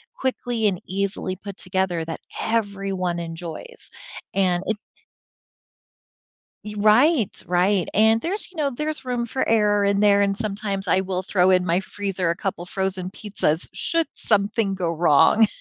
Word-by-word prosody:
quickly 245 - -1
and 185 -4 -1
easily 195 0 -2
put 200 +1 -8
together 185 -2 -1
that 165 - -5 0.2
everyone 195 -5 -1
enjoys. 170 - -8 0.4
And 185 -2 +1
it 220 - 0 1.9
Y 210 0 -6
right, 220 - +3
right, 180 +1 +2
and 220 +2 +4
there's, 370 - -3
you - - -18
know, 295 -2 +2
there's 305 +4 -3
room 245 -1 -1
for 260 +3 -2
error 210 -2 +3
in 200 0 +2
there, 205 -1 +5
and 200 -1 +1
sometimes 200 -2 -3
I 190 - +3
will 185 -1 -2
throw 185 -1 +2
in 180 -1 +4
my 175 +1 +1
freezer 195 -2 -3
a 170 - 0
couple 185 -3 -4
frozen 190 -1 -2
pizzas 190 -6 -2
should 330 -1 0
something 205 -1 +1
go 180 -3 -1
wrong. 170 +6 +5
200 Hz, 150 wpm, -23 LUFS, 185-220 Hz, 1.9 s, there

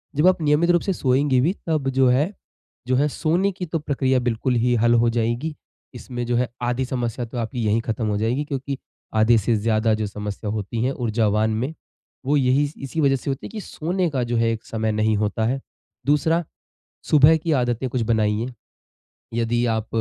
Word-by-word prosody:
जब 150 +5 +4
आप 185 -2 +3
नियमित 150 +3 +3
रूप 175 -1 +3
से 195 - -1
सोएँगी 135 -3 +2
भी 165 +8 +2
तब 155 -4 0
जो 135 0 +3
है, 140 +9 +2 0.6
जो 130 - +2
है 140 +3 +3
सोने 170 +7 +1
की 180 -1 -5
तो 165 0 -2
प्रक्रिया 135 -3 +1
बिल्कुल 125 +1 0
ही 125 0 +3
हल 120 +1 +3
हो 120 - +3
जाएगी। 120 +6 -1 0.4
इसमें 120 0 -5
जो 120 0 0
है 125 - +1 0.2
आधी 120 +2 0
समस्या 120 -2 -3
तो 120 +2 -8
आपकी 120 +2 -3
यहीं 110 +2 +2
ख़त्म 115 0 -3
हो 105 -1 0
जाएगी। 115 +7 0
क्योंकि 140 -1 -4 0.4
आधे 110 +2 +5
से 110 +2 +1
ज़्यादा 110 +1 +1
जो 110 0 -1
समस्या 105 +1 -5
होती 110 +2 -3
हैं 130 - +1
ऊर्जावान 110 -3 +1
में 130 +8 -2 0.5
वो 145 +2 +3
यही 135 +2 +3
स 145 - -11
इसी 140 +4 -3
वजह 140 -2 +4
से 135 - -4
होती 135 - -5
हैं - - -13
कि 220 - -5
सोने 175 +2 -2
का 130 -4 -1
जो 120 0 -2
है 115 0 +2
एक 110 -1 -4
समय 110 -1 -1
नहीं 110 0 +1
होता 105 +1 0
है। 130 +4 0 0.5
दूसरा, 160 +4 +2 0.6
सुबह 150 +2 +6
की 160 +1 -2
आदतें 125 -2 0
कुछ 125 0 -1
बनाइए। 110 0 +1 0.9
यदि 120 +1 +1
आप, 110 -1 -1
125 Hz, 205 wpm, -23 LUFS, 115-145 Hz, 0.9 s, सुबह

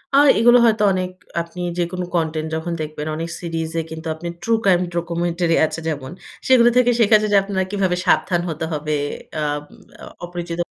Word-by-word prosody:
আর 290 +1 +6
এগুলো 240 +1 +6
হয়তো 220 -2 +3
অনেক 185 0 -2 0.3
আপনি 170 +1 -10 0.2
যেকোনো 180 +1 -2
কনটেন্ট 160 -1 -1
যখন 165 +2 -3
দেখবেন 155 0 -5
অনেক 165 +2 -4
সিরিজে 165 -1 -3
কিন্তু 160 +1 -7
আপনি 165 +2 -7
ট্রু 230 - 0
ক্রাইম 180 -3 +4
ডকুমেন্টারি 170 0 0
আছে। 160 - -5
যেমন, 145 -4 -4 0.4
সেগুলো 240 -2 +6
থেকে 245 -1 +5
শেখা 220 -1 +6
যায় 215 - -1
যে - - +7
আপনার 195 -1 -1
কিভাবে 190 -3 +1
সাবধান 175 -1 +2
হতে 160 0 -3
হবে। 150 0 -2 0.4
অ্যাম 150 -1 -1 0.4
অ - - -7 0.2
অপরিচিত 175 -1 -6
170 Hz, 175 wpm, -20 LUFS, 160-190 Hz, 0.4 s, যে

